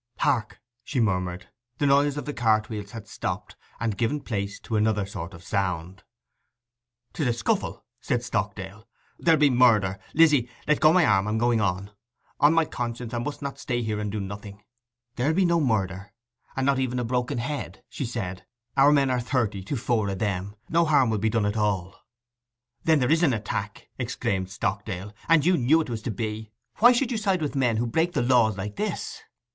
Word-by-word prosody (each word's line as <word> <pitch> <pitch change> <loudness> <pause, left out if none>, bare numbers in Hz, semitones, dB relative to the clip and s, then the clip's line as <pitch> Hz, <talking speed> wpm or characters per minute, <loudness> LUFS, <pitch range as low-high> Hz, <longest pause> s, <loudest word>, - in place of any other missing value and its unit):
'Hark!' 120 -7 0 0.2
she 130 - -2
murmured. 90 -3 -1 0.3
The 145 - 0
noise 140 +1 +3
of 145 - -4
the 145 - -4
cartwheels 110 -3 0
had 115 0 -9
stopped, - - -5 0.2
and 115 -3 -1
given 120 +6 +1
place 100 -6 -4
to 110 - -4
another 105 -1 +2
sort 95 -1 -7
of 85 - -13
sound. 90 -1 -2 1.1
''Tis 150 -6 -1
a 120 - +2
scuffle!' 200 - -2
said 125 -2 -1
Stockdale. 105 -2 -4 0.3
'There'll 165 -3 +4
be 145 -2 +5
murder! 110 -6 +4 0.2
Lizzy, 150 -7 +5 0.2
let 150 0 +3
go 155 - +6
my 175 -1 +5
arm; 100 -3 +3
I - - -1
am 110 - 0
going 120 -1 +2
on. 100 0 -1 0.5
On 145 +2 +6
my 165 0 +3
conscience, 120 -2 -5
I 120 - -1
must 145 +4 -5
not 140 -1 -5
stay 120 -2 -2
here 110 -1 -2
and 105 -1 -3
do 105 - -3
nothing!' 100 +1 -7 0.5
'There'll 145 +6 +1
be 190 0 +3
no 170 -1 +3
murder, 100 -6 -1 0.4
and 135 - 0
not 140 -1 +2
even 125 -1 -1
a 125 - 0
broken 125 +1 -1
head,' 140 +5 -4
she 140 - -5
said. 100 -6 -5 0.3
'Our 140 +1 +6
men 140 -3 +3
are 125 -1 +1
thirty 115 -6 -1
to 140 - -2
four 115 -4 0
of 95 - -3
them: 100 0 -2
no 170 +1 +3
harm 140 -7 +3
will 110 - 0
be 110 +2 +1
done 110 -1 +1
at 105 +1 -1
all.' 95 -3 0 0.9
'Then 160 -1 +5
there 130 -1 +1
is 165 +1 +4
an 150 -7 +4
attack!' 105 -2 -4
exclaimed 95 -1 -2
Stockdale; 100 0 -3 0.2
'and 165 -2 +5
you 180 0 +4
knew 145 +6 +4
it 155 -6 -3
was 110 -2 -3
to 125 - -4
be. 110 -1 -4 0.3
Why 240 +3 +7
should 250 +1 +1
you 230 - -1
side 195 -6 0
with 145 - -2
men 125 -5 +2
who 120 - 0
break 160 +9 0
the - - +1
laws 120 -4 +3
like 105 +1 -5
this? - - -3
115 Hz, 200 wpm, -26 LUFS, 105-140 Hz, 1.1 s, Why